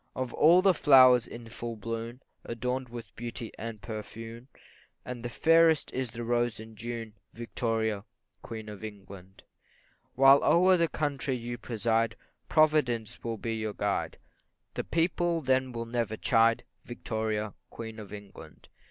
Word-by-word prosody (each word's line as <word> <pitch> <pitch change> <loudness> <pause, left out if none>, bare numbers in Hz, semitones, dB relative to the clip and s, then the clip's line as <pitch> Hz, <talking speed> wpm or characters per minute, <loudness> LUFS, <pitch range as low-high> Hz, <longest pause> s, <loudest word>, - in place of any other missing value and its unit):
CHORUS. 130 - -1
Of - - -12
all 170 +4 +6
the 195 -1 +6
flowers 130 -6 +6
in 115 0 -9
full 115 0 -6
bloom, 115 +3 -5 0.2
Adorn'd 125 +2 -3
with 120 -1 -9
beauty 115 -1 -6
and 110 -1 -6
perfume, 115 +2 -8 0.6
The 120 -1 -5
fairest 165 +4 +4
is 130 -1 -2
the 120 +1 -6
rose 120 -1 0
in 110 0 -11
June, 115 0 -6 0.2
Victoria, 110 -3 -2 0.4
Queen 110 -2 -7
of 105 0 -9
England. 95 -3 -10 0.7
While 135 +1 +7
o'er 185 +2 +5
the 170 -1 +2
country 140 -4 -2
you 120 0 -5
preside, 115 0 0 0.3
Providence 150 -8 +2
will 115 -1 -3
be 115 +1 -3
your 110 -1 -3
guide, 100 -1 -2 0.6
The - - -3
people 170 0 +1
then 130 -3 +1
will 115 -1 -4
never 115 -2 -2
chide, 115 +1 +3 0.2
Victoria, 110 -3 -3 0.2
Queen 110 -1 -8
of 105 -2 -10
England. 100 -6 -12
115 Hz, 145 wpm, -29 LUFS, 110-130 Hz, 0.7 s, While